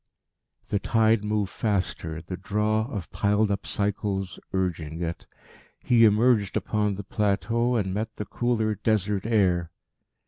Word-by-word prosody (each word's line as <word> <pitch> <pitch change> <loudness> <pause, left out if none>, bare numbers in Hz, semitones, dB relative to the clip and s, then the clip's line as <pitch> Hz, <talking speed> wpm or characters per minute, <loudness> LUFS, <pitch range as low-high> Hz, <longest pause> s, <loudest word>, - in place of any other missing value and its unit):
The 100 - +1
tide 110 0 +2
moved 105 -2 -1
faster, 90 -6 -2
the 90 +2 -5
draw 105 +3 0
of 100 -6 -5
piled 105 0 +2
up 100 - -3
cycles 100 -2 -2
urging 85 -3 -2
it. 85 0 -5 0.6
He 115 -2 +5
emerged 110 -1 +3
upon 105 -2 0
the 100 - -6
plateau, 115 +5 0
and 95 -5 0
met 110 +2 -3
the 105 - -5
cooler 115 -2 0
Desert 105 -1 0
air. 90 -7 +2
105 Hz, 135 wpm, -26 LUFS, 95-110 Hz, 0.6 s, He